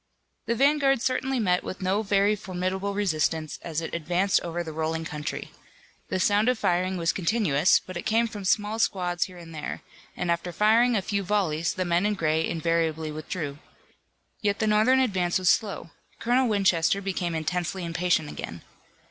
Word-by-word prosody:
The 235 - +1
vanguard 275 0 +3
certainly 260 0 0
met 180 -5 +1
with - - -6
no 190 +3 +1
very 205 0 +2
formidable 190 0 -3
resistance 160 -5 -1
as 165 -1 -3
it 165 - -6
advanced 175 +4 +1
over 175 0 -3
the 160 - -6
rolling 160 +1 -2
country. 150 -1 -5 0.6
The 185 - -1
sound 205 +4 +3
of 250 - +1
firing 185 -1 0
was 165 -1 +1
continuous, 185 -4 +3
but 185 - -10
it 175 - -3
came 230 +2 +2
from 210 -3 -8
small 210 +3 +1
squads 180 -5 0
here 180 -1 -12
and 165 -1 -11
there, 155 - -5 0.3
and 175 -1 -1
after 170 +1 -2
firing 225 +5 +4
a 200 - 0
few 200 0 -1
volleys 180 -5 0
the 185 - -1
men 175 +3 +2
in 210 - 0
gray 160 -3 +1
invariably 160 -1 -1
withdrew. 150 -1 -5 0.8
Yet 205 -1 +1
the 220 - 0
Northern 215 +5 +4
advance 185 -9 +1
was 185 -1 +4
slow. 200 -6 -2 0.3
Colonel 245 +1 +2
Winchester 195 -3 +2
became 185 -3 -2
intensely 175 +3 -2
impatient 170 -2 0
again. 85 - -7
185 Hz, 175 wpm, -26 LUFS, 165-210 Hz, 0.8 s, firing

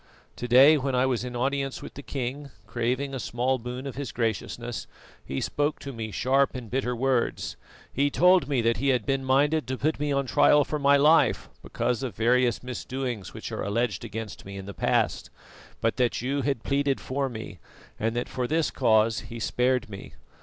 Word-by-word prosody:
To 125 - -4
day 135 +5 +7
when 135 -1 -1
I 125 +1 +3
was 125 -3 0
in 125 -1 -6
audience 135 +2 -1
with - - -9
the 140 - -8
king, 140 +1 -4 0.2
craving 125 +4 -2
a 135 - -3
small 125 +3 -1
boon 125 +3 -6
of 135 - -4
his 140 -1 -5
graciousness, 115 0 -3 0.4
he 70 - -4
spoke 145 +1 -1
to 140 - -6
me 110 -2 -5
sharp 135 +5 +1
and 120 -4 -7
bitter 125 -1 -1
words. 130 -1 0 0.4
He 140 +2 +2
told 180 +4 +4
me 140 -4 +1
that 115 0 +2
he 140 - -1
had 130 -2 +2
been 135 -1 0
minded 145 +4 +2
to 130 0 -2
put 155 +3 0
me 150 0 -1
on 140 -1 +1
trial 145 +3 +5
for 150 - -3
my 140 0 +5
life 150 -2 +4
because 125 -2 -2
of 125 -8 -4
various 120 +1 +2
misdoings 125 -4 -5
which - - -6
are - - -4
alleged 105 0 -1
against 110 -1 -6
me 100 0 -8
in 95 - -7
the 100 - -7
past, - - 0 0.5
but 115 - 0
that 125 -2 +1
you 135 +4 -1
had 135 -5 -1
pleaded 140 -1 +1
for 135 +1 -2
me 110 -3 -8 0.4
and 115 +2 -1
that 120 - -1
for 125 -1 -3
this 160 +1 +1
cause 110 -2 +3
he 115 - -7
spared 125 +2 +1
me. 100 -2 -10
130 Hz, 200 wpm, -26 LUFS, 120-140 Hz, 0.5 s, day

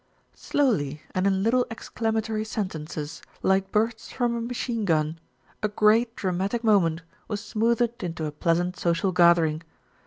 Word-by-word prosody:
Slowly 155 - 0
and 185 +1 +1
in 190 -1 +1
little 245 +3 +2
exclamatory 225 -1 -2
sentences, 160 -8 -5 0.2
like 190 0 +2
bursts 220 +1 0
from 240 -2 0
a 235 - -2
machine 235 -1 -2
gun, 160 -3 +1 0.4
a 215 - +2
great 220 +3 +3
dramatic 195 +5 -1
moment 170 -7 +3 0.2
was 210 -2 -3
smoothed 235 +2 0
into 165 -3 -3
a 150 - -3
pleasant 175 +4 0
social 170 +2 +1
gathering. 170 -3 +4
200 Hz, 135 wpm, -26 LUFS, 170-225 Hz, 0.4 s, gathering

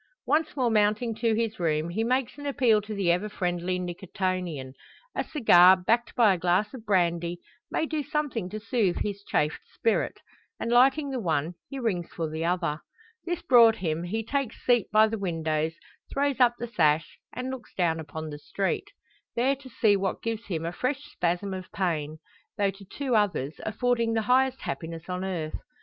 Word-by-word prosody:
Once 310 +1 +1
more 250 -4 +1
mounting 215 +2 +2
to 225 0 +1
his 225 -2 -1
room, 160 -1 0
he 210 +6 -1
makes 255 +1 0
an 285 - -5
appeal 240 -6 +3
to 210 +1 -6
the 190 -4 +2
ever 180 +5 0
friendly 180 -2 -1
Nicotian. 180 -5 -3 0.4
A - - -1
cigar, 190 - +6
backed 230 +6 0
by 220 -5 +5
a 180 - -3
glass 180 +6 +1
of 230 -4 -10
brandy, 175 -3 +1 0.3
may - - 0
do 310 -1 -2
something 290 -9 -2
to 215 - -5
soothe 220 -4 0
his 200 -1 -4
chafed 150 -5 0
spirit; 225 - 0 0.4
and 230 - -2
lighting 275 +4 +4
the 260 - -2
one, 160 -4 0 0.2
he 275 - -6
rings 200 -9 -1
for 165 -2 -3
the 160 +1 -4
other. 170 -3 0 0.5
This 350 -1 -3
brought 230 -3 +7
him, 165 -4 -2
he 210 +6 -2
takes 275 -1 -2
seat 240 -5 +3
by 215 +1 +6
the 220 0 -3
window, 160 -4 -1 0.4
throws 280 -1 0
up 240 -1 +5
the 240 - -4
sash, 160 -9 +1
and 255 +1 -4
looks 260 -2 -8
down 165 -3 +1
upon 155 0 -6
the 145 - -7
street. 160 +6 -2 0.5
There 260 +4 +2
to 270 -1 -13
see 220 -3 +3
what 195 -1 -2
gives 230 -1 -3
him 165 -4 -3
a 170 - -2
fresh 265 +8 -2
spasm 180 +3 -1
of 185 -1 -7
pain; 155 -5 -2 0.4
though 200 -2 +2
to 195 +1 -14
two 260 +5 -2
others, 185 -9 +1
affording 230 +1 +1
the 225 -1 +1
highest 260 +3 +2
happiness 165 0 -5
on 180 0 -2
earth. 170 -5 -3
205 Hz, 185 wpm, -27 LUFS, 175-240 Hz, 0.5 s, brought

